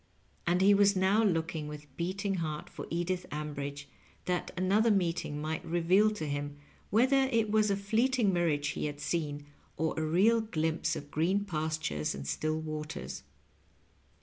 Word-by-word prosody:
And 175 +2 +3
he 200 +2 +7
was 200 0 +5
now 190 +4 +3
looking 165 -5 0
vnth 150 0 -8
beating 195 +4 -2
heart 155 -3 -4
for - - -7
Edith 175 +2 -2
Ambridge, 145 -1 -4 0.4
that 180 -1 -1
another 200 +5 +3
meeting 170 -7 0
might 155 +1 -3
reveal 175 +5 +3
to 160 - -4
him 145 0 -3 0.3
whether 260 +6 +4
it 225 -3 +2
was 215 -1 +3
a 200 - +1
fleeting 220 +1 +2
mirage 155 -5 +1
he - - -2
had 145 0 -6
seen, 145 -4 -2 0.3
or 160 +1 0
a - - 0
real 195 +9 +4
glimpse 160 -6 -1
of 145 0 -8
green 190 +6 +1
pastures 155 - -2
and 70 0 -7
still 155 - -1
waters. 150 - -5
170 Hz, 155 wpm, -31 LUFS, 150-200 Hz, 0.4 s, he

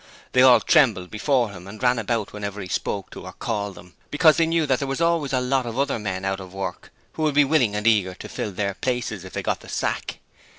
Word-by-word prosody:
They 125 - +4
all 125 -2 +8
trembled 110 - +3
before 120 0 +1
him 90 -1 -11
and 105 +4 -10
ran 125 -1 +3
about 115 -1 -2
whenever 105 -1 -5
he 95 - -6
spoke 100 +1 -3
to - - -9
or 95 - -8
called 105 -3 -3
them, 90 -1 -14 0.2
because 155 +1 +5
they 165 - +3
knew 165 -1 +1
that 130 -3 +1
there 140 - -2
were 135 - -2
always 165 -4 +1
a 130 - +2
lot 125 0 0
of 115 +1 -5
other 140 -3 0
men 95 -2 -4
out 95 0 -1
of 95 0 -10
work 95 -1 -5 0.2
who - - -6
would 155 -2 +1
be 145 -1 +6
willing 135 -8 +2
and 105 +1 -3
eager 100 -5 +3
to - - -9
fill 105 - -4
their 100 +1 -2
places 120 -4 -3
if 95 - -11
they - - -3
got - - -1
the - - -14
sack. - - -2
115 Hz, 255 wpm, -23 LUFS, 100-135 Hz, 0.2 s, all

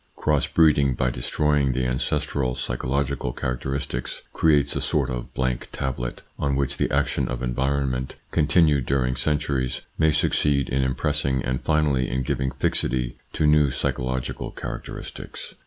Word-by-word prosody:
Cross 75 -2 +1
breeding, 70 -5 +4
by 65 +1 +1
destroying 70 +3 +1
the 65 0 0
ancestral, 65 0 -1
psychological 65 +1 -1
charac 60 -1 -2
teristics, 65 -2 -3
creates 75 -3 +3
a - - -1
sort - - 0
of - - -5
blank 65 -1 -1
tablet 60 -3 -3 0.2
on 70 -1 +1
which 70 0 0
the - - +1
action - - +1
of 60 0 -4
environment, 65 +1 -1 0.2
continued 75 -4 +3
during 65 -2 +1
centuries, 70 -2 0 0.2
may 80 0 +5
succeed 75 -2 +2
in 65 +1 +1
impressing 65 0 0
and 65 0 -1
finally 75 -5 +2
in 65 +1 -1
giving 65 +1 -1
fixity 65 -2 0 0.2
to 75 - 0
new 75 -1 +5
psychological 65 -1 -2
characteristics. - - -7
65 Hz, 140 wpm, -24 LUFS, 65-75 Hz, 0.2 s, may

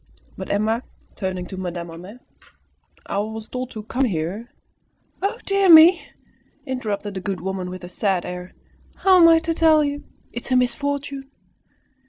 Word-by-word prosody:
But - - -7
Emma, 220 +3 0 0.3
turning 185 -2 -4
to 190 - -8
Madame 175 -2 -5
Homais, 180 +7 -10 0.9
"I - - -2
was 220 +1 -5
told 255 0 -5
to 215 -4 -8
come 260 +5 0
here 195 +4 -3 0.4
" - - -42
"Oh, 395 +2 -1
dear 395 -1 +2
me!" 320 -1 +8 0.6
interrupted 215 -6 -4
the 190 - -4
good 190 -1 -3
woman, 190 0 -4
with 185 0 -8
a - - -7
sad 185 0 -1
air, 180 0 -7 0.4
"how 375 -2 +5
am 335 - +9
I 330 0 +7
to 330 0 -1
tell 320 -2 +4
you? 290 0 -3 0.3
It 240 - -5
is - - -8
a - - +4
misfortune!" 275 +2 -1
220 Hz, 170 wpm, -22 LUFS, 185-285 Hz, 0.9 s, am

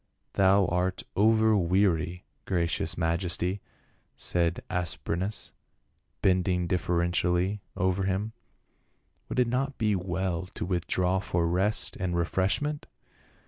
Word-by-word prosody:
"Thou 95 0 +4
art 90 +1 -1
over 110 +1 +4
weary, 90 -2 +1 0.2
gracious 85 -2 -1
majesty," 90 +3 0 0.5
said 85 0 0
As 90 -2 -1
prenas, 95 +5 -3 0.7
bending 90 -1 +2
deferentially 90 +2 0 0.2
over 95 +1 +1
him. 100 +4 -1 1.0
"Would - - -4
it 125 - +4
not 135 +3 -1
be 105 -3 +2
well 90 -1 -2
to - - -3
withdraw 90 +1 0
for 85 -3 0
rest 95 +5 +1
and 90 -2 -2
refreshment 95 - 0
90 Hz, 105 wpm, -28 LUFS, 85-100 Hz, 1.0 s, Thou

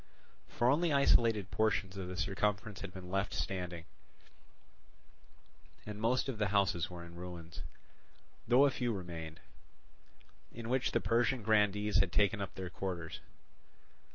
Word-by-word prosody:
For 120 - 0
only 155 +5 +3
isolated 115 -7 +4
portions 100 -3 +1
of 95 -2 -5
the 90 0 -6
circumference 100 +2 -1
had 100 - -6
been 90 -1 -9
left 95 +1 -1
standing, 90 -3 -3 2.0
and 105 0 -6
most 120 +4 +2
of 125 -5 -4
the 105 - +2
houses 95 -4 +1
were 85 -1 -8
in 85 - -12
ruins; 85 -1 -8 0.9
though 125 +4 +6
a 140 - +3
few 120 -3 -1
remained, 85 -4 -6 1.1
in 115 0 -7
which 130 0 +1
the - - +2
Persian 120 +1 +1
grandees 105 -1 +3
had 100 -3 +2
taken 105 +2 +2
up 100 - -5
their 95 -1 -5
quarters. 85 -4 -4
100 Hz, 140 wpm, -34 LUFS, 90-115 Hz, 2.0 s, though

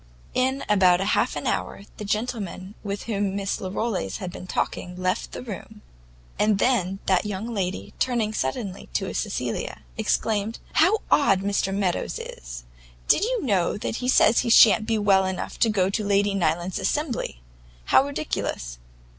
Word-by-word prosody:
In 260 +2 +1
about 185 -4 +5
half 195 +2 +1
an - - -4
hour - - -2
the - - -6
gentleman 205 -3 -3
with 200 -1 -4
whom 200 -3 -1
Miss 200 -1 -2
Larolles 190 - -2
had 185 -2 -5
been 185 - -9
talking, 180 0 -2
left 185 0 -1
the - - -7
room, 215 -1 -9 0.6
and 210 -1 +3
then 195 -5 +1
that 185 -2 +3
young 210 +3 -4
lady, 190 -2 -3
turning 235 -4 0
suddenly 195 - -3
to - - -1
Cecilia, - - -3 0.2
exclaimed, 220 0 0 0.2
"How 440 - +5
odd 195 -10 +4
Mr 200 -1 0
Meadows 195 -3 -1
is! - - -8 0.4
Do - - +6
you 460 - -1
know, 195 -7 +2
he 245 +4 -3
says 235 -3 +5
he 240 - 0
shan't 215 -2 +7
be 225 -1 +1
well 200 -2 +4
enough 190 -1 -4
to 230 - +4
go 195 -3 +1
to 215 - -1
Lady 200 0 +2
Nyland's 175 0 0
assembly! 285 - -2 0.5
How - - +5
ridiculous! 65 - -3
200 Hz, 155 wpm, -25 LUFS, 185-225 Hz, 0.6 s, shan't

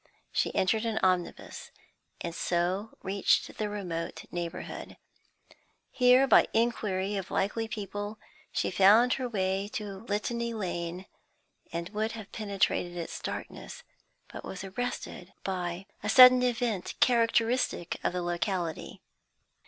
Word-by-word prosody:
She - - +1
entered 215 +4 +2
an 225 -2 -1
omnibus, 185 -2 -1 0.5
and 170 - -4
so 180 +5 -1
reached 195 +1 +1
the 210 -1 -1
remote 180 -5 -4
neighbourhood. 170 -1 -6 0.9
Here, 250 +1 +5
by 270 - +6
inquiry 210 -4 0
of 190 - -5
likely 225 +3 -1
people, 205 0 -5 0.3
she - - -1
found 210 +7 +6
her 255 -2 -2
way 195 -2 -1
to 205 -2 -4
Litany 230 +2 -2
Lane, 175 -2 -4 0.7
and 170 +1 -4
would 215 +2 -2
have 220 -3 -9
penetrated 200 -4 -1
its 170 - -5
darkness, - - -7 0.4
but - - -9
was 190 - -6
arrested 195 -3 -5
by 180 -1 -3 0.2
a 210 - -3
sudden 255 +1 +9
event 235 -6 -1
characteristic 230 -5 +2
of - - +1
the 180 0 -3
locality. 175 -1 -3
200 Hz, 120 wpm, -29 LUFS, 180-230 Hz, 0.9 s, sudden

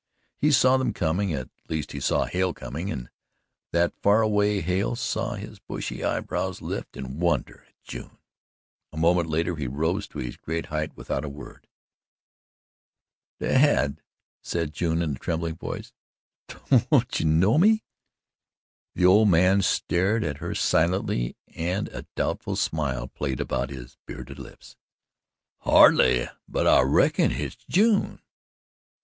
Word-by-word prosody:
He 150 - +3
saw 130 -2 +5
them 130 -1 -1
coming 90 +4 0
at 65 -5 -4 0.2
least 80 -3 -3
he - - -5
saw - - +1
Hale 90 -1 -1
coming, 70 +9 -5
and - - -6 0.6
that 85 0 +2
far 105 +2 +4
away 105 -1 +2
Hale 90 +7 0
saw 125 - -2
his - - -9
bushy - - -6
eyebrows - - -2
lift - - -6
in 65 +3 -6
wonder 85 -4 -1
at - - -34
June. - - -9 0.7
A 75 - -10
moment 85 +1 +2
later 80 +2 0
he 70 -3 -3
rose 80 +10 -1
to - - -11
his - - -5
great 80 +1 -4
height 75 +1 -4
without 65 - -3
a 75 - -4
word. 70 0 -12 1.7
"Dad," 130 - +2 0.4
said 85 -3 -3
June 85 +2 0
in 80 - -1
a 65 - -5
trembling 85 -1 -3
voice, - - -7 0.5
"don't 125 0 +1
you 80 - +1
know 95 - +4
me?" 215 +4 +4 1.1
The 90 - +2
old 105 +3 +6
man 90 +3 +4
stared 95 +4 +1
at 75 -3 -3
her 85 +1 -4
silently 80 -8 +1 0.2
and 90 +5 -2
a - - -9
doubtful - - -2
smile 65 -6 -1
played 65 -1 -4
about 65 - -2
his 65 -3 -10
bearded 70 0 -8
lips. 65 - -13 0.8
"Hardly, 60 -1 +5 0.2
but - - -1
I - - +6
reckon - - +3
hit's 70 +3 -4
June." 210 +2 +2
85 Hz, 145 wpm, -25 LUFS, 75-100 Hz, 1.7 s, old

